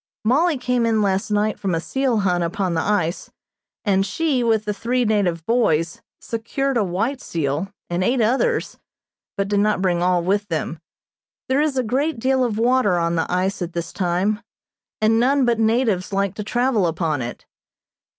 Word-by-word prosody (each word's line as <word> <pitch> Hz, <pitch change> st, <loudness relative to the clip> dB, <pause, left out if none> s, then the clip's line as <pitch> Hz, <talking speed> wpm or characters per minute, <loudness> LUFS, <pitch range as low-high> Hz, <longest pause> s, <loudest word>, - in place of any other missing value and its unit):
Mollie 300 Hz, +7 st, +3 dB
came 250 Hz, -2 st, 0 dB
in 220 Hz, -2 st, +2 dB
last 195 Hz, 0 st, 0 dB
night 210 Hz, +1 st, 0 dB
from 190 Hz, -4 st, -1 dB
a -, -, 0 dB
seal 255 Hz, +3 st, 0 dB
hunt 180 Hz, -3 st, +1 dB
upon 180 Hz, +1 st, -1 dB
the 165 Hz, -, 0 dB
ice, 180 Hz, -4 st, -1 dB, 0.6 s
and 195 Hz, -2 st, +3 dB
she, 260 Hz, +5 st, 0 dB
with 220 Hz, -2 st, +1 dB
the 210 Hz, -, -1 dB
three 240 Hz, +4 st, 0 dB
native 185 Hz, -7 st, 0 dB
boys, 170 Hz, -9 st, +1 dB, 0.2 s
secured 260 Hz, +4 st, -2 dB
a 230 Hz, -, +3 dB
white 225 Hz, +9 st, -2 dB
seal, 160 Hz, +4 st, -2 dB, 0.2 s
and 175 Hz, +1 st, -1 dB
eight 245 Hz, +6 st, +1 dB
others, 265 Hz, -, +1 dB, 0.6 s
but 195 Hz, 0 st, 0 dB
did 205 Hz, 0 st, +1 dB
not 210 Hz, 0 st, +2 dB
bring 180 Hz, -2 st, +1 dB
all 180 Hz, -1 st, +2 dB
with 200 Hz, +3 st, 0 dB
them. 165 Hz, -2 st, -3 dB, 0.7 s
There 265 Hz, +2 st, +3 dB
is 300 Hz, -3 st, 0 dB
a 255 Hz, -, +2 dB
great 270 Hz, +6 st, 0 dB
deal 260 Hz, +2 st, +1 dB
of 225 Hz, -4 st, -1 dB
water 235 Hz, -5 st, +3 dB
on 170 Hz, 0 st, 0 dB
the 165 Hz, +1 st, -1 dB
ice 185 Hz, +2 st, 0 dB
at 175 Hz, -1 st, -4 dB
this 170 Hz, 0 st, -4 dB
time, 190 Hz, +4 st, 0 dB, 0.6 s
and 220 Hz, +1 st, +3 dB
none 265 Hz, +2 st, +3 dB
but 235 Hz, -2 st, +1 dB
natives 220 Hz, -4 st, +1 dB
like 195 Hz, -1 st, 0 dB
to 210 Hz, -, -5 dB
travel 240 Hz, -3 st, +1 dB
upon 160 Hz, -3 st, -1 dB
it. 120 Hz, 0 st, -6 dB
210 Hz, 180 wpm, -21 LUFS, 180-245 Hz, 0.7 s, Mollie